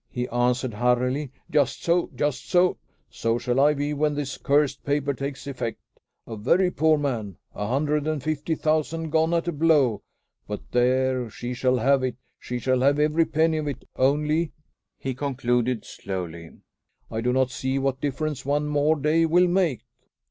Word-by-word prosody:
He 125 -1 -3
answered 120 0 0
hurriedly, 125 +5 +1 0.2
"Just 145 -3 +1
so! 170 +1 +2
just 145 +1 -2
so! 180 0 +3 0.3
So 115 0 0
shall 125 +1 0
I 150 +2 +5
be 145 +1 -1
when 150 0 0
this 145 -1 -3
cursed 145 0 +1
paper 140 0 0
takes 135 +1 -5
effect. 125 -5 -4 0.5
A 115 - -7
very 175 - +2
poor 155 0 +3
man! 115 - -3 0.2
A 105 - -4
hundred 150 +4 0
and 155 -4 -2
fifty 155 +1 -1
thousand 155 +1 -1
gone 160 +1 +2
at 170 0 0
a - - +1
blow! 145 -8 +3 0.5
But 105 0 -4
there, 130 0 +2
she 120 +3 -5
shall 125 0 +1
have 135 +3 +3
it! 130 -2 -2 0.2
She 125 - -4
shall 130 +1 +1
have 140 +2 +4
every 155 +2 +3
penny 160 0 +1
of 150 - -3
it; 140 -3 -5
only," 150 +4 +1 0.4
he 135 - -3
concluded 125 -3 -1
slowly, 85 -4 -6 0.6
"I 110 - -2
do 125 +2 +1
not 130 0 +1
see 130 +2 -2
what 135 -1 -1
difference 145 0 -2
one 145 +2 0
more 150 +1 +2
day 155 +3 +2
will 175 +3 +4
make." 175 - +1
140 Hz, 170 wpm, -25 LUFS, 125-155 Hz, 0.6 s, I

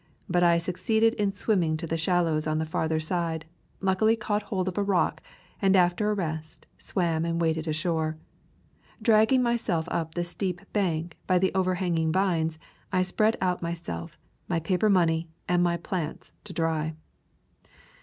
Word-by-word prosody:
But 175 - +2
I 170 -1 +5
succeeded 185 +6 +1
in 205 -4 0
swimming 185 -6 +1
to 160 - -5
the 165 - -2
shallows 165 -2 +1
on 155 0 0
the 160 - 0
farther 160 0 -1
side, 165 0 -2 0.4
luckily 195 +4 +3
caught 215 -1 -1
hold 190 -3 -2
of 185 - -2
a - - +2
rock, 195 -3 +1 0.4
and 195 -1 +4
after 180 +3 +3
a 210 - +1
rest 160 -4 -5
swam 165 -4 0
and 170 0 -1
waded 160 -1 0
ashore. 155 0 -1 0.8
Dragging 225 +3 +4
myself 225 -9 0
up 160 -1 -2
the 175 - 0
steep 180 0 -3
bank 170 -5 -1
by 185 - +4
the 190 +1 +2
overhanging 180 -3 +1
vines, 165 -4 +1 0.3
I 185 -1 +3
spread 215 +5 +2
out 180 -1 0
myself, 165 - -5 0.3
my 170 -2 0
paper 185 +6 +1
money, 165 -4 +2 0.2
and 175 0 +2
my 175 -1 +2
plants 170 -2 -4
to 205 - -7
dry. 160 -1 -1
175 Hz, 160 wpm, -27 LUFS, 160-190 Hz, 0.8 s, I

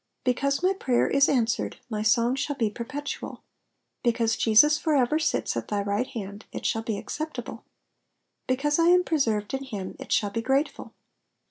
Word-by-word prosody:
"*' - - -53
Because 275 +4 0
my 375 +1 +4
prayer 255 -10 +1
is 275 0 +4
answered, 235 -4 0
my 215 -3 -3
song 230 +3 +3
shall 275 +2 -2
be 225 -5 0
perpetual; 280 +6 -6 0.6
because 230 -2 +1
Jesus 265 +7 +5
for 310 -2 +1
ever 275 +3 +2
sits 320 - 0
at - - -3
thy 205 -1 -1
right 205 +5 -1
hand, 200 -1 -7
it - - -7
shall 225 - +1
be 225 -2 -3
acceptable; 310 +8 -6 0.8
because 295 +4 +1
I 330 - +4
am 360 +1 +5
preserved 225 -11 0
in 270 0 -2
him, 205 -8 -6
it - - -9
shall 205 -1 +2
be 230 - -2
grateful. 270 +5 -1
250 Hz, 175 wpm, -26 LUFS, 220-290 Hz, 0.8 s, Jesus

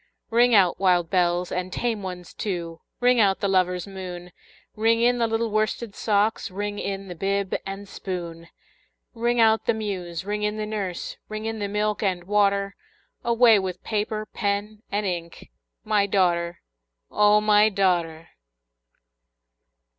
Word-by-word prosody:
Ring 240 +1 +5
out, 185 -4 +4
wild 180 -3 +2
bells, 180 -1 +1
and 180 0 -3
tame 230 -1 -2
ones 180 -2 -7
too! 170 -5 -4 0.2
Ring 245 0 +4
out 195 -3 +3
the 200 - 0
lover's 180 -2 +1
moon! 180 -2 -8 0.4
Ring 225 +1 +2
in 245 +1 +3
the 230 - +2
little 225 0 -1
worsted 215 +1 -1
socks! 210 +1 +1
Ring 205 +2 -4
in 195 0 -4
the 180 - -6
bib 195 +2 -1
and 195 +1 -6
spoon! 170 -4 -6 0.7
Ring 240 0 0
out 220 -1 +4
the 235 - +3
muse! 185 -5 -4
ring 210 +1 -2
in 210 +1 -1
the 215 - -2
nurse! 200 -5 -4
Ring 215 0 -5
in 225 0 -3
the 205 - -2
milk 210 +1 -1
and 185 -4 0
water! 200 0 +1 0.5
Away 235 -2 +5
with 185 -2 -5
paper, 215 0 -2
pen, 205 +1 -3
and 205 +1 -1
ink 170 - -5 0.3
My 210 -2 +2
daughter, 175 -3 +1 0.5
O 210 0 +5
my 210 0 +5
daughter! 175 -5 0
200 Hz, 150 wpm, -24 LUFS, 180-215 Hz, 0.7 s, Ring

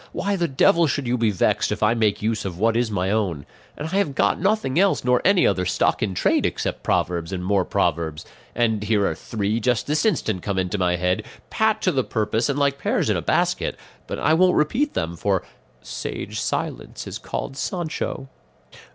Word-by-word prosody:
Why 200 0 -1
the 175 -3 0
devil 165 +4 +4
should 140 0 -1
you 120 +1 +1
be 115 -2 +2
vexed 95 -4 +1
if - - -2
I 105 +2 +4
make 110 -3 0
use 110 0 0
of 90 -3 -5
what 115 +3 +2
is 120 -1 +1
my 95 -2 -1
own? 95 -10 -1 0.3
And 150 +2 -4
I 190 - -1
have 170 -9 0
got 100 - +2
nothing 195 -6 +1
else, 195 0 +3
nor 125 0 +3
any 195 -2 +4
other 95 -2 +2
stock - - +1
in 95 -4 -1
trade - - +2
except - - -2
proverbs 85 -1 -1
and 90 -2 -4
more 100 -1 +2
proverbs; 80 -1 -1 0.3
and 110 -3 +1
here 105 -1 +1
are - - +1
three 110 0 -2
just 120 0 +1
this 150 +1 0
instant 115 - 0
come 100 0 -3
into 95 +1 -1
my 90 -1 +2
head, 90 +4 0 0.3
pat 220 0 +1
to 185 - +3
the 130 -4 +1
purpose 110 +1 -1
and 140 - 0
like 140 -1 +1
pears - - +1
in - - +1
a - - -1
basket; - - 0 0.3
but - - -4
I 155 - +2
won't 180 +2 +4
repeat 250 - +1
them, 85 +1 -2
for 95 +1 0 0.4
'sage - - -5
silence - - -3
is - - -6
called 135 - -5
Sancho. 160 -4 -3
115 Hz, 205 wpm, -23 LUFS, 95-150 Hz, 0.4 s, devil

